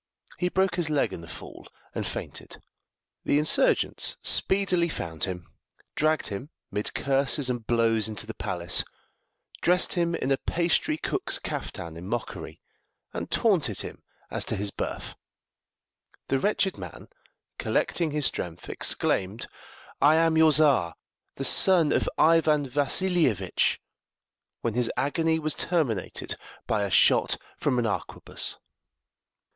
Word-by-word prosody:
He 180 - +1
broke 190 -1 +1
his 170 -3 0
leg 150 -2 +1
in - - -7
the 85 - -11
fall, - - -11 0.3
and - - -3
fainted. - - -6 0.6
The - - +2
insurgents 155 - +2
speedily 185 -3 +3
found 80 - -3
him, 90 -2 -7 0.4
dragged 155 -3 +1
him 110 +8 -6 0.2
mid 105 - -2
curses 140 -1 +1
and 120 -3 -5
blows 115 -2 +3
into 110 -2 -2
the - - -6
palace, 85 0 0 0.8
dressed 180 +1 +3
him 170 -2 0
in 135 - -2
a 135 - +3
pastrycook's 165 -2 0
caftan 85 -1 -6
in 85 +3 -8
mockery, 115 +2 -5 0.5
and - - -5
taunted - - +2
him - - -8 0.3
as - - -2
to - - -2
his 100 0 -2
birth. - - -5 1.2
The 135 - +2
wretched 200 +2 0
man, - - -9 0.5
collecting 170 -2 0
his 150 -1 0
strength, 85 -8 -3
exclaimed, 100 +4 -1 0.6
"I 150 +2 +6
am 165 0 +3
your 160 0 +6
Czar, 135 - +3 0.4
the 135 - -3
son 170 +2 +5
of - - +1
Ivan 155 -3 +4
Vassilievitch!" 145 - +1 0.8
when 115 - -1
his 120 0 +1
agony 160 +3 +1
was 155 -1 0
terminated 140 - -1 0.3
by 105 - 0
a 100 - -1
shot 90 - +4 0.2
from 125 - 0
an 120 - +1
arquebuss. 105 - -3
140 Hz, 130 wpm, -26 LUFS, 110-165 Hz, 1.2 s, I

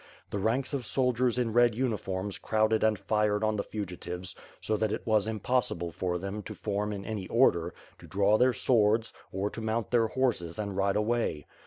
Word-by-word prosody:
The 100 - -2
ranks 120 +8 0
of 135 -3 -1
soldiers 125 0 +1
in 120 -3 0
red 120 -1 +4
uniforms 105 -5 -2
crowded 110 0 +2
and 110 -1 +3
fired 105 0 +1
on 110 0 +2
the 100 - -1
fugitives, 90 -3 -6 0.2
so 110 - -1
that 110 0 0
it - - -3
was 110 -2 +2
impossible 110 -6 -1
for 90 +1 -2
them 100 +3 -5
to - - -8
form 105 0 -2
in 100 -1 -5
any 105 -4 -4
order, 85 -9 +3 0.2
to - - -13
draw 100 +2 +3
their 130 +1 +5
swords, 115 -2 +2 0.2
or 100 +2 -2
to 115 - -6
mount 110 0 -2
their 115 -2 +4
horses 110 -9 -1
and 100 -2 -3
ride 100 0 +1
away. 105 - 0
105 Hz, 190 wpm, -29 LUFS, 100-115 Hz, 0.2 s, their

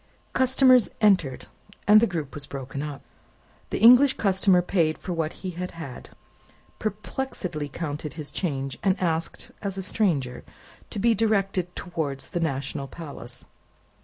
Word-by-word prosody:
Customers 260 -2 +5
entered, 185 - +3 0.4
and 210 +1 +9
the 235 - +4
group 160 -7 -4
was 145 -2 -5
broken 135 0 -5
up. 150 -2 -6 0.7
The - - -2
English 250 +5 +7
customer 190 -2 +3
paid 165 -4 +1
for 180 - -5
what 160 -2 -1
he 185 - -2
had 180 +1 -5
had, 140 -7 -8 0.7
perplexedly 205 - -4
counted 150 -1 -4
his 150 -3 -6
change, 135 -6 -3
and 190 -1 +2
asked, 165 -2 -2
as 195 -2 -3
a 190 - -3
stranger, 160 - 0 0.5
to - - -7
be 230 +3 +4
directed 195 -5 0
towards 155 -6 -4
the 175 - -2
National 140 -3 -2
Palace. 130 -5 -9
175 Hz, 140 wpm, -26 LUFS, 145-200 Hz, 0.7 s, and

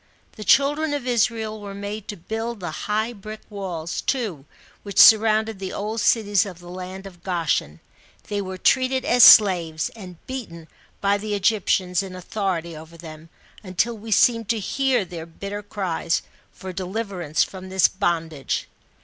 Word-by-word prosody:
The 215 - -9
children 290 +6 +3
of 285 - -5
Israel 225 -3 0
were 200 -1 -7
made 205 +1 -6
to 205 - -6
build 225 +6 -4
the 175 -3 -5
high 215 +7 -2
brick 215 0 -9
walls, 175 -5 -4
too, 210 - -2 0.4
which 200 -2 -8
surrounded 220 -1 +6
the 190 -1 -5
old 215 +2 -3
cities 205 -4 +3
of 190 -5 -8
the 175 0 -12
land 185 +1 -7
of 180 -3 -12
Goshen; 160 - -1 0.5
they 205 -1 -2
were 190 -1 -6
treated 260 +5 +2
as 245 0 +5
slaves, 170 -6 +7
and 185 -6 -11
beaten 185 -12 -7 0.3
by 200 0 +2
the 210 0 -3
Egyptians 190 -3 +1
in 190 -2 -8
authority 180 -3 -3
over 160 +2 -12
them, 160 -1 -11 0.3
until 205 +4 -1
we 220 +1 -10
seem 230 +2 +4
to 230 +2 0
hear 255 +2 0
their 170 -2 -8
bitter 200 +5 -6
cries, 185 -5 -2 0.3
for 185 -1 -8
de 190 - -4
liverance 185 -6 -1
from 190 -1 -10
this 190 -3 +4
bondage. 165 -7 -2
200 Hz, 160 wpm, -23 LUFS, 175-220 Hz, 0.5 s, slaves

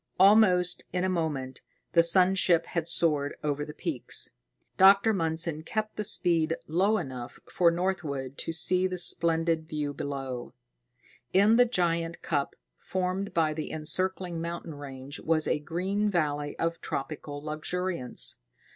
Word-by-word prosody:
Almost 185 -3 +5
in 180 0 -1
a 185 - +1
moment, 145 -7 -3 0.3
the 170 - +6
sun 180 +2 +5
ship 175 -3 +3
had 170 -2 -3
soared 150 -4 +1
over 145 -1 -1
the 150 - -7
peaks. - - 0 0.4
Dr. 200 +3 +6
Mundson 165 -3 0
kept 215 +5 -3
the 210 - -3
speed 165 -4 +2
low 195 +7 +1
enough 130 - -7
for 175 -2 +3
Northwood 165 -7 -3
to - - -2
see 180 +3 +4
the 185 0 -5
splendid 165 -2 +1
view 150 -2 -3
below. 135 -4 -6 0.8
In 200 +4 +5
the 245 +1 +6
giant 170 -6 -1
cup 145 -3 -2 0.2
formed 185 +2 -3
by 160 -2 +2
the 155 0 -5
encircling 175 +2 -2
mountain 170 -1 -5
range 140 0 -9
was 155 -1 0
a - - 0
green 190 +7 -1
valley 145 -5 -1
of 165 0 -2
tropical 145 +1 -5
luxuriance. 155 -1 -2
165 Hz, 140 wpm, -28 LUFS, 150-185 Hz, 0.8 s, the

